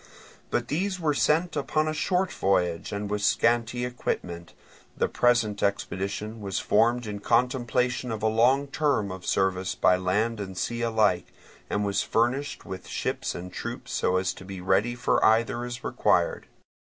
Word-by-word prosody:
But 120 Hz, -, -1 dB
these 185 Hz, +5 st, -1 dB
were 155 Hz, -3 st, +1 dB
sent 160 Hz, +4 st, +2 dB
upon 155 Hz, +2 st, 0 dB
a 155 Hz, -, 0 dB
short 185 Hz, +4 st, 0 dB
voyage 90 Hz, -4 st, 0 dB
and 100 Hz, 0 st, -3 dB
with 105 Hz, 0 st, -2 dB
a -, -, -4 dB
scanty 120 Hz, +3 st, +2 dB
equipment. 85 Hz, -8 st, -4 dB, 0.4 s
The -, -, +2 dB
present 120 Hz, -4 st, +2 dB
expedition 100 Hz, +2 st, -2 dB
was 95 Hz, -2 st, -3 dB
formed 120 Hz, +3 st, +2 dB
in 105 Hz, -1 st, -5 dB
contemplation 125 Hz, +2 st, +1 dB
of 110 Hz, -1 st, -4 dB
a -, -, +4 dB
long 125 Hz, +6 st, +3 dB
term 135 Hz, -10 st, 0 dB
of 95 Hz, -1 st, -8 dB
service 95 Hz, -1 st, 0 dB
by 90 Hz, -, +4 dB
land 105 Hz, +5 st, 0 dB
and 95 Hz, -2 st, -6 dB
sea 120 Hz, +4 st, -2 dB
alike, 110 Hz, -6 st, +2 dB, 0.4 s
and 105 Hz, 0 st, 0 dB
was 100 Hz, 0 st, +1 dB
furnished 130 Hz, +5 st, 0 dB
with 95 Hz, -2 st, -7 dB
ships -, -, -2 dB
and 90 Hz, +1 st, -7 dB
troops -, -, -6 dB
so 90 Hz, -, +1 dB
as 95 Hz, 0 st, 0 dB
to -, -, -12 dB
be 95 Hz, 0 st, -7 dB
ready 95 Hz, +6 st, +1 dB
for 125 Hz, -, +1 dB
either 115 Hz, +2 st, +3 dB
as 125 Hz, 0 st, -6 dB
required. -, -, +1 dB
110 Hz, 165 wpm, -27 LUFS, 95-125 Hz, 0.4 s, a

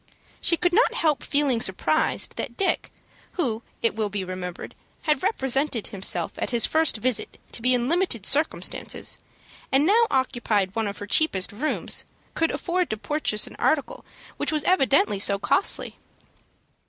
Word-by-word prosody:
She 335 Hz, -, +4 dB
could 355 Hz, +1 st, +1 dB
not 460 Hz, +6 st, +3 dB
help 305 Hz, -3 st, +1 dB
feeling 280 Hz, -5 st, +1 dB
surprised 310 Hz, +12 st, 0 dB
that -, -, -5 dB
Dick, 390 Hz, -, 0 dB, 0.4 s
who, 240 Hz, -11 st, -1 dB, 0.2 s
it 230 Hz, -, +2 dB
will 215 Hz, -2 st, -1 dB
be 200 Hz, -1 st, -3 dB
remembered, 185 Hz, -1 st, -6 dB, 0.3 s
had 300 Hz, -4 st, +1 dB
represented 270 Hz, -, 0 dB
himself 190 Hz, -5 st, +1 dB
at -, -, -2 dB
his 235 Hz, -2 st, +4 dB
first 320 Hz, -6 st, +2 dB
visit 245 Hz, +2 st, -1 dB
to -, -, -4 dB
be 250 Hz, +1 st, +4 dB
in 245 Hz, 0 st, -1 dB
limited 330 Hz, -, 0 dB
circumstances, 300 Hz, +6 st, -1 dB, 0.5 s
and 270 Hz, +3 st, +4 dB
now 450 Hz, +6 st, +4 dB
occupied 235 Hz, -7 st, 0 dB
one 225 Hz, -2 st, 0 dB
of 200 Hz, -, -5 dB
her 205 Hz, -, -6 dB
cheapest 200 Hz, -4 st, +2 dB
rooms, 265 Hz, +10 st, -1 dB, 0.3 s
could 325 Hz, -, +1 dB
afford 360 Hz, 0 st, -1 dB
to 215 Hz, -, -2 dB
purchase 260 Hz, -4 st, 0 dB
an -, -, -9 dB
article 315 Hz, -, 0 dB, 0.3 s
which -, -, -1 dB
was 305 Hz, -1 st, +1 dB
evidently 270 Hz, -, +3 dB
so 200 Hz, 0 st, +3 dB
costly. 280 Hz, -, 0 dB
260 Hz, 155 wpm, -24 LUFS, 210-315 Hz, 0.5 s, She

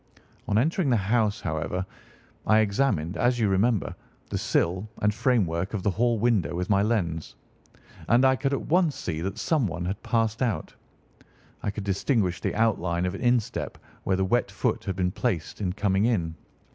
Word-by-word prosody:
"On 105 Hz, -, +1 dB
entering 155 Hz, -, +2 dB
the 120 Hz, -, +4 dB
house, 105 Hz, 0 st, +1 dB
however, 80 Hz, +4 st, -2 dB, 0.6 s
I 110 Hz, -, +5 dB
examined, 100 Hz, -, 0 dB
as 120 Hz, 0 st, +2 dB
you 115 Hz, -3 st, +2 dB
remember, 100 Hz, -1 st, +1 dB, 0.4 s
the -, -, -1 dB
sill 95 Hz, +5 st, 0 dB
and 105 Hz, 0 st, +2 dB
framework 100 Hz, -6 st, 0 dB
of 95 Hz, -, -3 dB
the 100 Hz, -, +2 dB
hall 115 Hz, +5 st, +1 dB
window 105 Hz, -8 st, +1 dB
with 90 Hz, +3 st, -2 dB
my 100 Hz, 0 st, +4 dB
lens, 90 Hz, -8 st, -1 dB, 0.7 s
and 120 Hz, +3 st, +4 dB
I 130 Hz, 0 st, +5 dB
could 135 Hz, +1 st, -1 dB
at 140 Hz, -, -2 dB
once 170 Hz, -3 st, +2 dB
see 80 Hz, -2 st, -4 dB
that 95 Hz, +3 st, -3 dB
someone 95 Hz, -, 0 dB
had 95 Hz, +3 st, -3 dB
passed 115 Hz, 0 st, 0 dB
out. 120 Hz, -4 st, -1 dB, 0.9 s
I -, -, -1 dB
could 105 Hz, 0 st, -5 dB
distinguish 95 Hz, -2 st, 0 dB
the -, -, -2 dB
outline 90 Hz, -6 st, +1 dB
of 90 Hz, -, -1 dB
an 100 Hz, -, -6 dB
instep 120 Hz, -3 st, 0 dB, 0.3 s
where 95 Hz, -, +1 dB
the 95 Hz, -, +1 dB
wet 120 Hz, +6 st, +1 dB
foot -, -, -1 dB
had 95 Hz, -, -2 dB
been 90 Hz, -1 st, 0 dB
placed 105 Hz, -4 st, -2 dB
in 95 Hz, -3 st, 0 dB
coming 100 Hz, 0 st, +1 dB
in. 90 Hz, -9 st, 0 dB
105 Hz, 180 wpm, -26 LUFS, 90-120 Hz, 0.9 s, I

